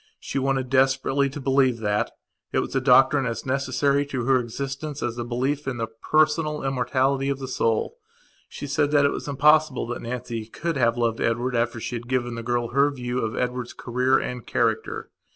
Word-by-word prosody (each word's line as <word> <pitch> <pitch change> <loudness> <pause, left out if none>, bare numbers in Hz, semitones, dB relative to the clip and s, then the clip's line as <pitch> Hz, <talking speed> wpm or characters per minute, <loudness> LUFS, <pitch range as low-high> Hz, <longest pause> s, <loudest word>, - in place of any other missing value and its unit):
She 140 - -3
wanted 135 -1 -1
desperately 135 +1 +2
to 145 +2 -7
believe 135 -2 +2
that. 105 -2 0 0.4
It - - -1
was - - -1
a 135 - +2
doctrine 135 +1 +5
as 115 -1 -4
necessary 140 +1 +1
to 130 -4 -3
her 130 0 +4
existence 135 +5 -5
as 120 -1 -2
a - - -1
belief 130 +5 -2
in 130 -3 -2
the 115 - -1
personal 150 +6 +1
immortality 135 +1 +1
of 140 - -1
the 135 -1 -6
soul. 120 - -1 0.5
She - - -7
said 145 +1 +1
that 145 -1 +4
it - - +3
was - - -5
impossible 150 -1 +3
that 120 - -4
Nancy 115 -2 -5
could 165 +8 -3
have 120 -3 +2
loved 115 -1 0
Edward 120 +2 0
after 120 0 0
she 120 +2 -4
had 120 +1 -10
given 120 -1 -1
the 115 - -5
girl 120 0 -1
her 140 +3 +3
view 125 -3 -3
of 110 -2 -2
Edward's 125 -1 -2
career 125 +2 +1
and 125 -1 -4
character. - - -1
130 Hz, 195 wpm, -24 LUFS, 120-140 Hz, 0.5 s, doctrine